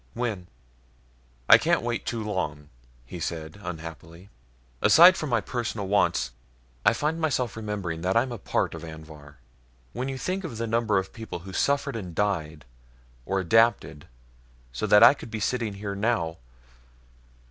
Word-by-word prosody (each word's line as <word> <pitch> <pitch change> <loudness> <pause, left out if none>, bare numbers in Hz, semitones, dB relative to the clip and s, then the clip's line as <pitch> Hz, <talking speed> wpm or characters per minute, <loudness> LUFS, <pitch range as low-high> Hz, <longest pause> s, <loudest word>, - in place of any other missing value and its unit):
When?" 110 -7 -3 1.0
"I - - +9
can't - - +1
wait 120 -1 -3
too 115 -2 -2
long," 95 -8 -4 0.4
he 85 +8 -8
said, 80 +2 -5
unhappily. 85 +1 -9 0.5
"Aside 175 +4 +8
from 155 - -4
my 120 -3 +2
personal 110 -2 -4
wants, 100 -11 +1 0.5
I - - +6
find 150 +7 -2
myself 130 -6 0
remembering 100 -7 -4
that 95 +5 +1
I'm 125 +2 +1
a 120 - -6
part - - -1
of 80 -1 -8
Anvhar. 80 -2 -11 0.6
When 130 +2 -3
you 135 - -4
think 185 +7 -3
of 130 -10 -6
the 115 - -2
number 115 -2 +1
of 95 0 -3
people 110 -7 -7
who 95 +2 -10
suffered 140 +3 0
and 90 -7 -6
died 80 -8 -2 0.6
or 95 - 0
adapted 105 -5 +2 0.7
so - - -2
that 105 - +7
I - - +9
could 140 - -11
be 110 - -5
sitting 110 -1 -2
here 100 0 -5
now 100 -6 -1
105 Hz, 160 wpm, -26 LUFS, 85-120 Hz, 1.0 s, I